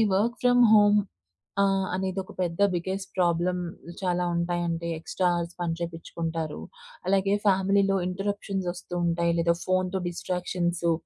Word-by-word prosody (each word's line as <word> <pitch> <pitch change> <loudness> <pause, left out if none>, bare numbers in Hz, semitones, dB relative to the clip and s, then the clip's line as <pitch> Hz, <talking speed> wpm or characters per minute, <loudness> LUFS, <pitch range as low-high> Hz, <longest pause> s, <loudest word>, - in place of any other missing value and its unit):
Work 230 +5 +1
from 245 0 +5
home 210 -1 +6 0.6
ఆహ్, 195 -1 +2
అనేదొక 190 0 -3
పెద్ద 170 0 -2
biggest 190 +2 -3
problem 180 +1 +1 0.4
చాలా 180 -1 0
ఉంటాయండి. 170 -1 -1
ఎక్స్ట్రా 180 +3 -1
హౌర్స్ 170 0 -3
పని 170 -1 0
చేపించుకుంటారు. 165 -1 -4 0.5
అలాగే 195 +1 +2
ఫ్యామిలీలో 195 0 +3
ఇంటెర్ప్షన్స్ 195 0 -3
వస్తూ 175 0 -10
ఉంటాయి 170 0 +1
లేదా 170 0 +3
ఫోన్‌తో 185 0 +1
డిస్ట్రాక్షన్సు. 175 -1 -1
180 Hz, 120 wpm, -27 LUFS, 170-195 Hz, 0.6 s, home